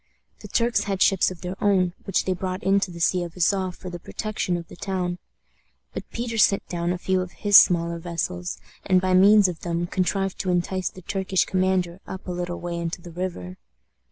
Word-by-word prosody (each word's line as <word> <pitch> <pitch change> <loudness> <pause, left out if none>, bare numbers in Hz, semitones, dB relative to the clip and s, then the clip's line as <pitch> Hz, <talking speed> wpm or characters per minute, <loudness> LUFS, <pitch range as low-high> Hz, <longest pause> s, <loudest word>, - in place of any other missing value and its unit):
The - - -10
Turks 235 0 +1
had 195 -2 -2
ships 190 0 +4
of 185 -3 -10
their 180 +1 -4
own, 185 -4 +3
which 195 - 0
they 185 - +1
brought 185 0 -4
into 195 0 +2
the 170 -1 -9
Sea 180 +2 +2
of 170 -1 -8
Azof 185 +1 +1
for 185 - -8
the 175 - -6
protection 195 -2 -3
of 170 -1 -8
the - - -12
town. 180 -1 -3 0.7
But - - -7
Peter 230 -1 -3
sent 200 -1 +3
down 175 0 -2
a 180 - -1
few 185 +1 0
of 180 -1 -6
his 205 -1 +1
smaller 170 -2 +6
vessels, 160 - -3 0.3
and 185 -1 +3
by 185 0 0
means 200 +2 +7
of 175 -3 -5
them 170 0 -2
contrived 190 +2 -1
to 185 - -2
entice 180 +1 0
the 185 - -14
Turkish 190 0 0
commander 185 -2 0
up 190 0 -7
a - - -3
little 175 0 -4
way 175 -1 -4
into 170 +1 -3
the 175 0 -11
river. 165 - -5
185 Hz, 210 wpm, -24 LUFS, 175-190 Hz, 0.7 s, means